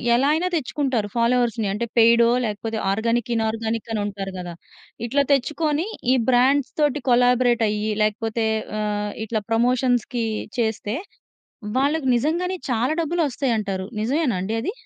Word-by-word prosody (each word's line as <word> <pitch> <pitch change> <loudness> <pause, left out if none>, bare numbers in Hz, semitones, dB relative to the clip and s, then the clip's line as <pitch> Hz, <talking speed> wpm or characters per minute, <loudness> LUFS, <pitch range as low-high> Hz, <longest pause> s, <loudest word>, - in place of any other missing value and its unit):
ఎలా 270 +4 +3
అయినా 335 +4 0
తెచ్చుకుంటారు 260 -6 -1
ఫాలోవర్స్‌ని. 235 -2 +1
అంటే 210 +4 -2
పెయిడొ 230 0 +6 0.2
లేకపోతే 220 +1 -3
ఆర్గానిక్, 230 +3 0
ఇనార్గానిక్ 225 0 -2
అని 215 - -1
ఉంటారు 200 -1 -5
గదా! 175 -1 -6 0.5
ఇట్లా 280 +4 +2
తెచ్చుకొని 300 +4 +1 0.3
ఈ - - +4
బ్రాండ్స్‌తోటి 275 +3 +2
కొలబోరేట్ 245 -1 +3
అయ్యి 210 +1 -1
లేకపోతే 220 +2 0 0.3
ఆహ్, 210 -1 -2
ఇట్లా 220 0 -2
ప్రమోషన్స్‌కి 245 0 +1 0.3
చేస్తే 220 -1 -1 0.8
వాళ్ళకి 285 +1 +1
నిజంగానే 340 +9 0
చాలా 245 +2 +1
డబ్బులు 335 +2 -1
ఒస్తాయి 260 -1 -1
అంటారు. 195 -3 -3 0.2
నిజమేనా 260 - 0
అండి 195 +4 -3
అది? 330 - -2
235 Hz, 130 wpm, -22 LUFS, 220-270 Hz, 0.8 s, పెయిడొ